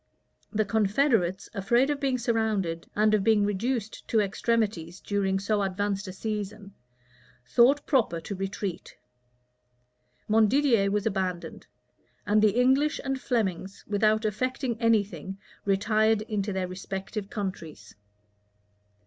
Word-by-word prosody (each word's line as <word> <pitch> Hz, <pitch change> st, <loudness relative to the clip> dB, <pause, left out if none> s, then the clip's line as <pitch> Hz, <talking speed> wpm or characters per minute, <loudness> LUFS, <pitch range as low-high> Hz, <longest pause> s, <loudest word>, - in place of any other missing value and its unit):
The 215 Hz, -1 st, +1 dB
confederates, 210 Hz, -3 st, +1 dB
afraid 235 Hz, +7 st, +2 dB
of 290 Hz, -, -2 dB
being 270 Hz, -3 st, 0 dB
surrounded, 215 Hz, -8 st, -1 dB
and 215 Hz, +1 st, +3 dB
of 210 Hz, -2 st, +3 dB
being 215 Hz, -2 st, +4 dB
reduced 220 Hz, +2 st, -2 dB
to 225 Hz, -, +2 dB
extremities 200 Hz, -4 st, -1 dB
during 195 Hz, -2 st, 0 dB
so 205 Hz, +1 st, 0 dB
advanced 200 Hz, +1 st, -2 dB
a -, -, -5 dB
season, 205 Hz, 0 st, -5 dB, 0.7 s
thought 265 Hz, -, +4 dB
proper 235 Hz, -, +1 dB
to 200 Hz, -, -6 dB
retreat. 195 Hz, -1 st, -5 dB, 1.3 s
Montdidier 225 Hz, 0 st, +3 dB
was 205 Hz, 0 st, -1 dB
abandoned; 190 Hz, -4 st, -3 dB, 0.6 s
and 210 Hz, +1 st, +3 dB
the 215 Hz, +2 st, +3 dB
English 270 Hz, +4 st, +3 dB
and 270 Hz, -1 st, -2 dB
Flemings, 195 Hz, -6 st, -2 dB
without 215 Hz, +1 st, +2 dB
effecting 255 Hz, +3 st, -1 dB
any 230 Hz, -2 st, +4 dB
thing, 195 Hz, -1 st, -8 dB, 0.3 s
retired 215 Hz, +2 st, +2 dB
into 210 Hz, -2 st, -2 dB
their 190 Hz, -1 st, -2 dB
respective 195 Hz, +2 st, -6 dB
countries. 165 Hz, -, -6 dB
210 Hz, 120 wpm, -27 LUFS, 195-230 Hz, 1.3 s, being